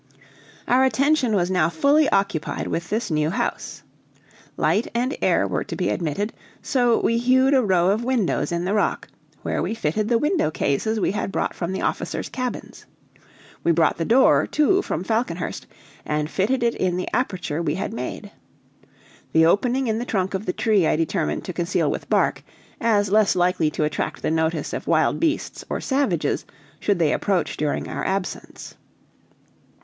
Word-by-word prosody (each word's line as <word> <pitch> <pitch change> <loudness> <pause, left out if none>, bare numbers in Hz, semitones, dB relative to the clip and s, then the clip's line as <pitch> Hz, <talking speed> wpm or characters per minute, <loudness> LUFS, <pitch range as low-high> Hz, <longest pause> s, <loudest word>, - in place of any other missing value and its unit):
Our 255 +2 +4
attention 265 -1 +2
was 180 -1 +1
now 175 -3 +2
fully 280 - +3
occupied 195 -5 -1
with 170 +1 -3
this 215 -2 -2
new 150 0 +1
house. 180 - -3 0.7
Light 215 - +1
and 250 +4 0
air - - +2
were - - -2
to - - -6
be - - -1
admitted, 180 +6 -2 0.3
so 245 -4 +2
we 230 0 +1
hewed 260 +3 +3
a 265 - +5
row 185 -3 +3
of 215 +4 0
windows 240 -9 0
in 170 +1 -1
the 195 - 0
rock, 210 - 0 0.3
where - - -1
we 225 - -2
fitted 210 +1 -1
the 235 - +4
window 300 - +1
cases 185 +10 -1
we 190 - +1
had 200 - -3
brought - - -1
from 170 0 -4
the 190 - -3
officers' - - -2
cabins. 255 -1 -6 0.8
We 170 - +3
brought 165 0 +2
the 165 - -1
door, 245 +9 +4
too, 375 +6 +2
from 175 - -3
Falconhurst, 220 -5 -2 0.4
and 150 0 -2
fitted 240 +6 0
it 235 0 +2
in 180 -1 -1
the 185 - -3
aperture 185 - -2
we 155 -2 -1
had 190 - -4
made. 125 - -6 1.0
The 160 0 +5
opening 245 +9 +2
in 220 -1 0
the - - -2
trunk 190 -6 -1
of 190 +2 -4
the - - +2
tree 205 -5 +2
I - - +2
determined 150 - -1
to 180 - -5
conceal 175 +2 0
with - - -5
bark, - - +2 0.4
as 205 -4 +2
less 210 -2 +4
likely 180 -3 +2
to 155 - -2
attract 150 -1 -3
the - - 0
notice 160 -1 -1
of - - -5
wild - - +2
beasts 325 -1 -1
or - - -2
savages 220 - 0 0.4
should 205 -2 +1
they 160 -3 +2
approach 195 -4 0
during 150 -1 -2
our - - -4
absence. 190 -1 -4
195 Hz, 175 wpm, -23 LUFS, 170-240 Hz, 1.0 s, a